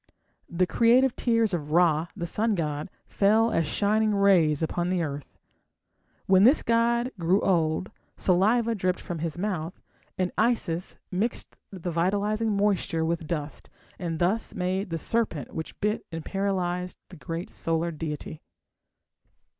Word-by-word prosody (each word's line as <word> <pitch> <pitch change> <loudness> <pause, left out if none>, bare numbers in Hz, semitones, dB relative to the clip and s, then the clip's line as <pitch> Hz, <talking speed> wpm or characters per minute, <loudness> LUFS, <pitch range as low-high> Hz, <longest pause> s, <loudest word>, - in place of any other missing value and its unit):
The 175 +2 +1
creative 245 +6 +3
tears 230 -4 +1
of 150 -3 -3
Ra, 165 -2 +3
the 175 -4 -4
sun 215 +5 0
god, 150 -3 -3 0.2
fell 220 +3 +3
as 165 - +1
shining 215 +4 +1
rays 175 -7 +4
upon 175 +2 -1
the 180 -2 0
earth. 145 -2 -6 0.9
When 190 0 +5
this 260 +7 +5
god 235 +2 +2
grew 175 +4 +3
old 165 -1 +1 0.3
saliva 220 +6 +2
dripped 185 -3 -1
from 170 -2 -6
his 165 +1 -3
mouth, 180 -3 -3 0.4
and 185 -1 0
Isis 205 -7 0
mixed 205 +6 -2 0.2
the 180 -2 -5
vitalizing 205 +5 0
moisture 195 -5 +1
with 165 -1 -2
dust, 150 -3 -5 0.3
and 170 -3 -3
thus 190 +7 0
made 190 +1 -1
the 165 - -2
serpent 190 - -1
which 160 - -6
bit 210 +1 0
and 165 -1 -6
paralysed 180 -2 -2
the 185 - -11
great 165 +3 -6
solar 165 +1 -1
deity. 155 -1 -6
180 Hz, 140 wpm, -26 LUFS, 165-210 Hz, 0.9 s, When